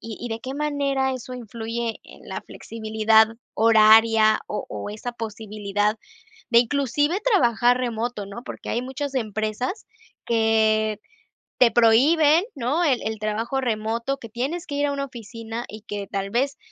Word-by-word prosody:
y 225 -2 -7
y 240 - -4
de 225 - -3
qué 260 +3 -6
manera 280 -3 0
eso 255 0 -7
influye 230 -1 -4
en - - -15
la - - -4
flexibilidad 220 0 +2 0.3
horaria, 220 0 +6
o 210 - -4
o - - -6
esa 215 +4 -5
posibilidad 210 -2 -2 0.5
de 235 - +8
inclusive, 290 - 0
trabajar 245 - +3
remoto, 235 -3 -3
no? 200 +5 -8
Porque - - -7
hay 240 - -1
muchas 270 +2 -5
empresas 220 - -3 0.4
que 220 -1 +2 0.6
te 250 -2 +6
prohíben, 290 - +5
¿no? 280 +7 0
El 265 -7 +2
el 220 -1 -3
trabajo 225 +5 -1
remoto, 230 +3 -1
que 230 - -10
tienes 280 - -3
que 285 - -6
ir 290 0 +1
a 285 - -1
una 275 0 -3
oficina 230 -1 -7
y 215 +1 -9
que 205 -1 -5
tal 195 0 -3
vez 270 +5 0
230 Hz, 155 wpm, -23 LUFS, 220-265 Hz, 0.6 s, de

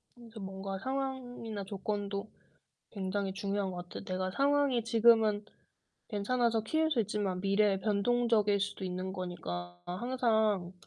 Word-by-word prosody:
그래서 230 -2 -12
뭔가 195 0 -5
상황이나 250 -3 -3
조건도 200 +1 -3 0.6
굉장히 195 -1 -2
중요한 200 -1 -1
것 175 0 -5
같아요. 175 - -8
내가 185 -1 -2
상황이 280 0 +2
지금은 225 -2 +4 0.6
괜찮아서 230 +2 +1
키울 315 +8 +1
수 265 -7 +3
있지만 205 -3 -1
미래에 200 0 +3
변동적일 210 0 +2
수도 200 -1 -2
있는 185 +1 -3
거니까 90 - -5
항상 220 -3 +1
205 Hz, 310 characters per minute, -32 LUFS, 190-235 Hz, 0.6 s, 지금은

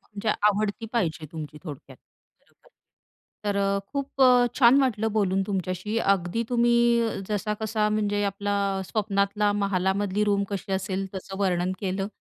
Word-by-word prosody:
म्हणजे 210 +1 -6 0.2
आवडती 210 +2 -1
पाहिजे 165 -8 -1
तुमची 155 -2 -7
थोडक्यात. 145 -4 -9 0.4
बरोबर, - - -29 0.8
तर 205 -1 0
अ, 200 0 +1
खूप 275 -1 -1
अ, 250 -1 +6
छान 260 +1 +6
वाटलं 225 -5 0
बोलून 195 -2 +1
तुमच्याशी. 190 +2 -2
अगदी 195 +1 +1
तुम्ही, 240 -1 +3 0.5
जसा-कसा 210 +1 -1
म्हणजे 205 -1 0
आपला 200 +1 -2 0.3
स्वप्नातला 205 0 0
महालामधली 200 0 0
रूम 200 -1 +2
कशी 195 -1 -4
असेल 190 0 -2
तसं 190 0 -7
वर्णन 180 -1 +1
केलं. 195 0 -2
205 Hz, 135 wpm, -26 LUFS, 190-215 Hz, 0.8 s, अ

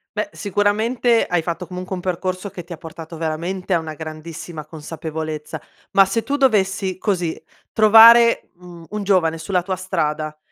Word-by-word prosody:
Beh, - - -1
sicuramente 220 +4 +1
hai 175 -1 0
fatto, 170 +2 -4
comunque, 180 +1 -6
un 180 - -6
percorso 185 +2 -3
che 175 -3 -9
ti 175 - -8
ha - - -9
portato, 165 +1 -10
veramente, 170 +4 -3
a 170 - +3
una 160 -1 -6
grandissima 155 0 -8
consapevolezza. 155 0 -6 0.3
Ma 195 - +6
se 195 +4 -1
tu 280 - -1
dovessi 195 -8 +1
così, 180 -5 -2 0.3
trovare, 230 +2 +7
mhmm, 175 -2 -13
un 210 -1 -4
giovane 180 -5 +2
sulla 180 +2 -1
tua 185 +1 -3
strada, 155 -4 -2
180 Hz, 160 wpm, -20 LUFS, 160-200 Hz, 0.3 s, trovare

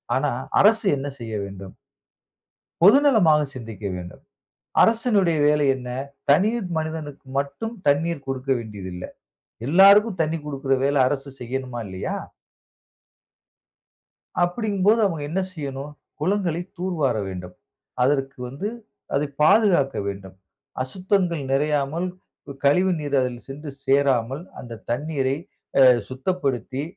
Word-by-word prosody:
ஆனா - - +1 0.3
அரசு 220 0 +4
என்ன 140 +1 -4
செய்ய 115 -2 -6
வேண்டும்? 95 -1 -10 1.1
பொதுநலமாக 210 - +6
சிந்திக்க 110 -4 -7
வேண்டும். 90 -1 -9 0.6
அரசினுடைய 215 -7 +3
வேலை 150 0 +3
என்ன? 125 -1 -8 0.4
தனி 185 +9 +5 0.3
மனிதனுக்கு 155 -3 -5
மட்டும் 220 +12 -3
தண்ணீர் 145 0 +1
கொடுக்க 135 0 -4
வேண்டியது 105 -5 -7
இல்ல. 90 - -7 0.6
எல்லாருக்கும் 195 +4 +6
தண்ணீ 160 +1 0
கொடுக்குற 135 -2 -1
வேல 140 +1 +2
அரசு 140 +1 -3
செய்யணுமா, 125 0 -4
இல்லையா! 95 0 -4 2.3
அப்டிங்கும் 200 +1 0
போது 225 +2 +5
அவுங்க 165 -6 -1
என்ன 190 - 0
செய்யணும், 140 -3 -6 0.3
குளங்களை 175 -1 0 0.2
தூர்வார 165 -10 0
வேண்டும். 90 -1 -7 0.5
அதற்கு 135 0 +1
வந்து 170 +11 -4 0.5
அதை 145 +2 +2 0.2
பாதுகாக்க 170 -6 +4
வேண்டும். 95 -1 -7 0.5
அசுத்தங்கள் 180 +2 0
நிறையாமல் 150 +4 0 0.4
கு 140 - -7
கழிவு 180 +7 +4
நீர் 145 -2 -1
அதில் 125 -2 -3
சென்று 145 +2 -7
சேராமல், 135 0 +2 0.2
அந்த 115 -2 -9
தண்ணீரை 135 +1 -1 0.4
அ - - +8 0.3
சுத்தப்படுத்தி 130 - -2
145 Hz, 110 wpm, -23 LUFS, 130-180 Hz, 2.3 s, அ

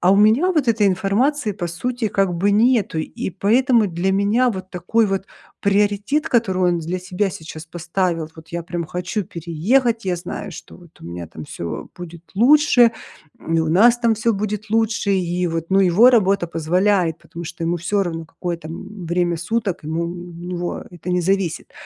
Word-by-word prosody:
а 180 - +4
у - - +4
меня 220 - +4
вот 305 -6 +1
этой 215 -3 +3
информации 210 +7 +1
по 180 -4 -4
сути 235 +7 -2
как 195 -3 +1
бы 190 +4 +1
нету, 220 -5 +2
и 160 - -4
поэтому 225 - +3
для 175 +2 -1
меня 210 +6 +2
вот 185 -3 -7
такой 210 +5 +1
вот 195 0 -2 0.3
приоритет, 205 +9 +1
который 190 -6 +1
он 175 -1 +2
для 170 +3 -3
себя 185 +2 -2
сейчас 160 -1 -9
поставил: 170 -1 -2
"Вот 160 0 -13
я 170 0 -4
прям 170 -1 -4
хочу 180 +5 -3
переехать, 210 - 0
я 180 - 0
знаю, 175 +1 -6
что - - -11
вот 175 -2 -19
у - - -12
меня 85 0 -6
там 80 -1 -9
всё 85 +2 -6
будет 170 -2 -9
лучше, 245 +1 +5 0.6
и 165 0 +2
у 160 - -1
нас 235 +8 +5
там 235 -2 +2
всё 230 +2 +1
будет 210 +1 -4
лучше". 225 -2 +1
И 180 -1 0
вот, 165 0 -3
ну, 190 - +4
его 195 +7 +6
работа 200 -6 +2
позволяет, 170 +1 +1
потому 170 +1 -9
что 170 +1 -7
ему 170 +1 0
всё 195 +4 0
равно, 165 -3 -4
какое 175 +1 -4
там, 160 -1 -9
м, 190 +1 -8
время 175 0 0
суток, 195 0 -2
ему 160 +2 -2
у - - -2 0.3
него 175 +1 -5
это 175 0 -7
не 180 0 +2
зависит, 190 -1 -1
185 Hz, 190 wpm, -20 LUFS, 170-215 Hz, 0.6 s, его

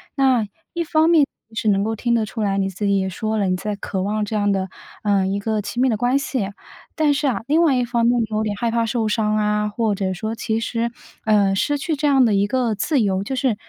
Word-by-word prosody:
那， 260 -5 +3 0.3
一 340 - -1
方 320 0 +2
面 315 -4 +5 0.3
是 220 -1 0
能 195 -1 +3
够 220 +2 -1
听 235 +2 0
得 225 -2 +2
出 220 +2 -6
来， 200 -2 0
你 195 -1 +1
自 195 +2 -4
己 200 0 +3
也 190 - -1
说 215 +4 -2
了， 200 - +1
你 185 - +1
在 205 +2 -4
渴 190 -1 -3
望 210 +1 -1
这 215 - -4
样 205 -1 +2
的， 190 -1 -1 0.4
呃， 200 -2 +2
一 195 +1 -1
个 215 0 -1
亲 235 +5 -3
密 260 - +4
的 225 - +2
关 245 +5 +1
系。 255 -7 -2 0.4
但 305 -2 +2
是 285 +1 0
啊， 250 - -1
另 310 +4 +3
外 310 -6 +4
一 250 - +1
方 235 -1 0
面 240 +1 +3
你 230 - +1
有 215 0 0
点 210 -1 -1
害 235 +2 0
怕 230 0 +1
受 225 0 -1
伤 215 0 +1
啊， 210 0 +1
或 215 -1 0
者 190 -1 -1
说 215 +4 -4
其 225 -1 -1
实， 230 0 -2 0.3
呃， 205 -3 +3
失 290 +9 +1
去 300 +2 -2
这 300 - -2
样 270 -3 +5
的 220 - +2
一 200 0 +2
个 245 -1 0
自 285 +8 0
由， 195 -1 0
就 265 - -3
是 255 -4 +1
220 Hz, 285 characters per minute, -21 LUFS, 205-250 Hz, 0.4 s, 面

